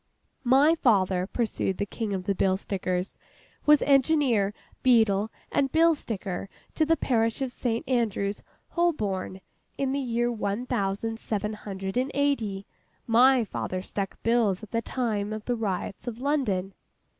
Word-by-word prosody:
'My 275 +5 +5
father,' 190 - +2
pursued 215 -4 -1
the 205 - -1
King 215 +1 -4
of 190 -2 -2
the 200 - 0
Bill 190 0 +2
Stickers, 185 -2 -3 0.5
'was 300 -1 +6
Engineer, 270 -7 +3 0.3
Beadle, 220 -4 +4 0.2
and 270 -1 +1
Bill 330 +1 +5
Sticker 195 - -5 0.2
to 310 - +1
the 325 0 +3
parish 230 -1 +1
of 265 -2 -2
St. 235 -1 -2
Andrew's, 215 -5 0 0.3
Holborn, 205 - -1 0.4
in 270 -1 0
the 280 - 0
year 240 -2 0
one 215 +1 -2
thousand 225 -1 -2
seven 210 -1 -2
hundred 195 0 -5
and 255 +2 +1
eighty. 230 -9 0 0.4
My 250 +2 +5
father 185 -3 -4
stuck 195 -1 -4
bills 225 -4 +2
at 215 - -10
the 230 - 0
time 215 -5 -2
of 215 0 -5
the 245 - 0
riots 200 -1 -3
of 235 -1 -4
London. 220 -10 0
225 Hz, 150 wpm, -27 LUFS, 195-255 Hz, 0.5 s, was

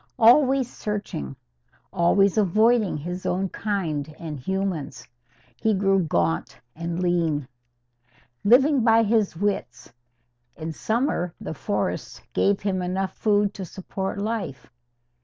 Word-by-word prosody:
Always 260 +2 +5
searching 205 - -5 0.6
always 190 +2 +3
avoiding 215 0 +3
his 175 +5 -5
own 190 +1 -1
kind 160 -9 -3
and 155 -4 -6
humans 175 -4 -3 0.5
he 220 -1 +1
grew 195 0 +3
gaunt 85 - -1 0.2
and 170 +2 -4
lean. 165 -6 +1 1.0
Living 265 +4 +5
by 225 0 +5
his 215 -5 +1
wits, 205 -7 -3 0.6
in 160 0 -5
summer 220 - -1
the - - -5
forests - - -3
gave 200 0 +2
him 190 -2 -1
enough 190 +2 -2
food 205 -1 +2
to 195 - -6
support 190 +2 -5
life. 195 - -4
195 Hz, 115 wpm, -24 LUFS, 165-215 Hz, 1.0 s, Always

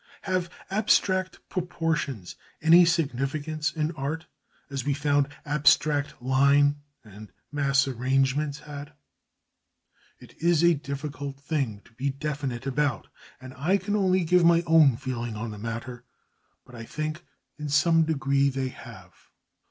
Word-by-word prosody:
Have 185 -2 -1 0.2
abstract 190 -2 +1
proportions 165 - -3 0.2
any 170 +3 +7
significance 155 -1 -1
in 155 0 -2
art, 155 +1 -4 0.4
as 140 -3 -4
we 140 +1 0
found 145 -1 +1 0.2
abstract 145 0 +2
line 140 +3 +3 0.3
and 105 -1 -13 0.2
mass 140 -2 +2
arrangements 135 +3 0
had? 145 0 -9 1.3
It - - -15
is 170 -1 +3
a 170 0 +6
difficult 140 -1 -6
thing 140 -8 -2
to - - -22
be 130 +5 -2
definite 140 -3 -4
about, 135 0 -1 0.3
and 130 0 -10
I 165 +10 +1
can 205 +2 -2
only 185 -2 +2
give 180 +2 +3
my 170 0 +5
own 160 -7 +5
feeling 120 -3 -4
on 110 +1 -5
the 105 - -8
matter; 115 +3 -6 0.6
but 125 - -17
I 115 -2 -8
think 155 +6 -5 0.4
in 150 -1 -4
some 165 +3 +4
degree 140 -3 +1
they 135 -1 -2
have. 100 -8 -12
145 Hz, 135 wpm, -26 LUFS, 130-160 Hz, 1.3 s, any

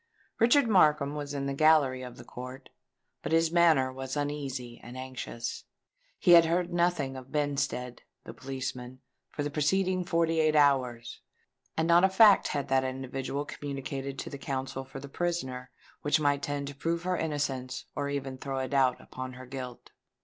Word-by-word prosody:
Richard 245 +3 +5
Markham 150 -8 +4
was 145 -1 -5
in 140 -1 -2
the 140 - -1
gallery 145 -3 +4
of 125 -1 -8
the - - -10
court; 125 +2 -9 0.5
but - - -4
his 165 0 +3
manner 160 -7 +4
was 130 +1 -5
uneasy 135 -5 -4
and 120 +2 -10
anxious:—he 130 - -4
had 170 -1 +9
heard 175 +1 0
nothing 170 -6 +1
of 130 0 -10
Benstead, 140 -4 -2 0.2
the - - -9
policeman, 130 -1 -6 0.3
for 145 - -4
the 145 - -3
preceding 185 +5 +1
forty 165 -2 +1
eight 155 -1 +3
hours; 130 -5 +2 0.6
and 160 +1 +1
not 170 +1 +6
a 190 - +6
fact 200 +1 +6
had 140 -2 -2
that 130 0 +3
individual 135 +2 -3
communicated 140 -1 -5
to - - -6
the 140 - -7
counsel 135 -2 -4
for 135 - -9
the 140 - -8
prisoner 135 -6 -3 0.3
which 145 +1 +2
might 145 -1 +1
tend 145 0 -3
to 140 - -9
prove 165 +4 -2
her 185 0 0
innocence 140 -5 -3
or 145 -1 -2
even 135 -2 -4
throw 135 0 -4
a 130 0 -1
doubt 130 -3 +2
upon 130 0 -7
her 130 +1 -10
guilt! 125 -1 -8
140 Hz, 170 wpm, -29 LUFS, 130-160 Hz, 0.6 s, had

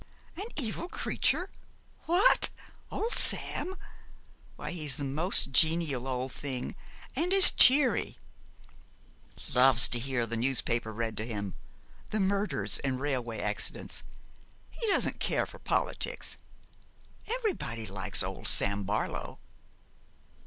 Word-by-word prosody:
'An 400 +5 -6
evil 265 +4 -3
creature! 365 +1 -1 0.6
What, 370 +9 +4 0.4
old 455 +2 -3
Sam? 380 +1 +2 0.8
Why - - -7
he 175 -3 -6
is 145 -4 -1
the 145 - -6
most 155 +3 +3
genial 155 -3 +2
old 130 0 -3
thing, 130 -3 -5 0.4
and 335 +7 -1
as 390 -1 +8
cheery 260 -2 +4 1.4
loves 125 -1 +6
to 120 - +1
hear 130 -1 -2
the 115 +1 -4
newspaper 120 -2 -1
read 110 0 -4
to 110 - -4
him 100 -4 -5 0.6
the 215 - -2
murders 200 +1 +1
and 130 -2 -3
railway 125 -5 -3
accidents. 105 0 -3 0.7
He 460 - -5
doesn't 400 - 0
care - - 0
for - - -14
politics. - - -2 0.9
Everybody 420 - -3
likes 95 -2 0
old - - -2
Sam 100 0 +2
Barlow.' 105 +3 -4
135 Hz, 115 wpm, -29 LUFS, -, 1.4 s, as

